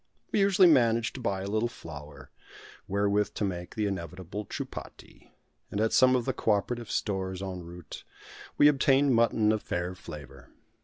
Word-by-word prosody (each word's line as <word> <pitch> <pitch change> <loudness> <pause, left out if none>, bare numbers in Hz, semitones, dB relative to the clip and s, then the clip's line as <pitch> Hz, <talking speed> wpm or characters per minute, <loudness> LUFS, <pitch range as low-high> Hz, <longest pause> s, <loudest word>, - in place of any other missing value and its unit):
We - - +2
usually 195 -2 +6
managed 115 -7 +3
to 130 - -7
buy 100 -4 -1
a - - -4
little 110 +3 0
flour, 75 - -11 0.6
wherewith 100 +1 +1
to - - -2
make 90 -2 -5
the 110 -2 0
inevitable 95 +1 -5
chupati, - - -8 0.4
and 100 - -3
at 110 +1 +1
some 130 0 +6
of 125 -2 0
the - - 0
co - - -3
operative 115 +3 -2
stores 95 -2 -2
en 95 -2 -5
route, 85 0 -10 0.5
we 145 - +7
obtained 140 -1 +4
mutton 115 -2 +3
of 110 -1 0
fair 90 +1 -3
flavour. 75 -6 -11
105 Hz, 165 wpm, -28 LUFS, 90-120 Hz, 0.6 s, we